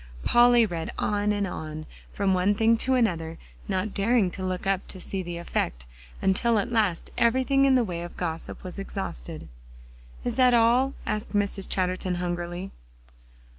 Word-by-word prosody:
Polly 240 -1 +6
read 170 -5 -4
on 205 0 +1
and 205 -1 0
on, 155 -3 -6 0.3
from 195 -2 +1
one 185 +3 +2
thing 225 +2 +4
to 260 +3 +1
another, 165 -9 0 0.3
not 195 +1 -1
daring 205 -2 +2
to 190 - -6
look 185 0 -3
up 195 -1 0
to 190 - -4
see 190 +1 -3
the 175 -1 -5
effect, - - -2 0.4
until 225 +4 +2
at 225 +4 -1
last 210 -7 0
everything 260 +3 +3
in 270 -1 +5
the 250 - +4
way 175 -5 -4
of 175 0 -8
gossip 165 -2 -4
was 185 +1 -6
exhausted. 195 - -6 0.8
"Is 240 0 -3
that 250 -2 +5
all?" 240 +4 +3
asked 210 -1 -3
Mrs. 200 -1 0
Chatterton 185 -1 0
hungrily. 175 +1 -4
195 Hz, 165 wpm, -26 LUFS, 175-230 Hz, 0.8 s, Polly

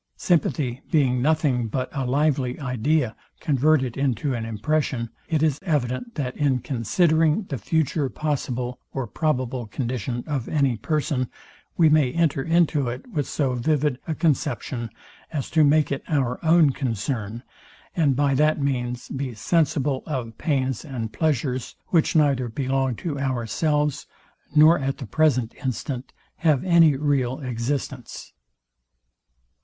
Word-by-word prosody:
Sympathy 140 -6 0
being 130 -5 +2
nothing 140 -5 +1
but 130 +4 -2
a 135 -3 -2
lively 135 -1 +1
idea 125 -1 0 0.2
converted 140 -3 +2
into 135 0 0
an 115 -2 -3
impression, 115 +1 -1 0.2
it 160 -2 +1
is 150 -3 +1
evident, 150 - -2
that, 130 -5 -3
in 140 -3 +2
considering 155 - +2
the 135 - -3
future 150 - 0
possible 125 -4 -3
or 135 -2 -2
probable 130 -2 -1
condition 120 +1 -3
of 140 -6 -3
any 140 -5 +2
person, 140 0 -1 0.5
we 165 - +6
may 150 -4 +4
enter 160 -5 +1
into 165 -3 +2
it 125 +2 -6
with 150 -8 -1
so 135 -4 0
vivid 140 +1 0
a 160 - -1
conception 130 -6 -1 0.4
as 145 -5 -4
to 160 -2 +4
make 150 +1 +3
it 140 - -1
our 135 -4 -1
own 160 -2 +5
concern; 115 -3 -3 0.5
and 150 -6 +3
by 140 0 +2
that 150 +3 +3
means 125 -3 -2
be 130 -3 -4
sensible 140 - +1
of 125 -7 -4
pains 135 -6 0
and 115 -6 -5
pleasures, 130 -5 -1
which 165 -2 +2
neither 140 -5 +3
belong 135 +1 -1
to 145 +2 -4
ourselves, 140 +3 0 0.5
nor 155 +3 +7
at 135 0 -2
the 135 - -6
present 130 -3 +1
instant 130 0 -3 0.3
have 155 -5 +2
any 170 -5 +5
real 135 -3 0
existence. 125 +2 -4
135 Hz, 135 wpm, -24 LUFS, 125-155 Hz, 0.5 s, nor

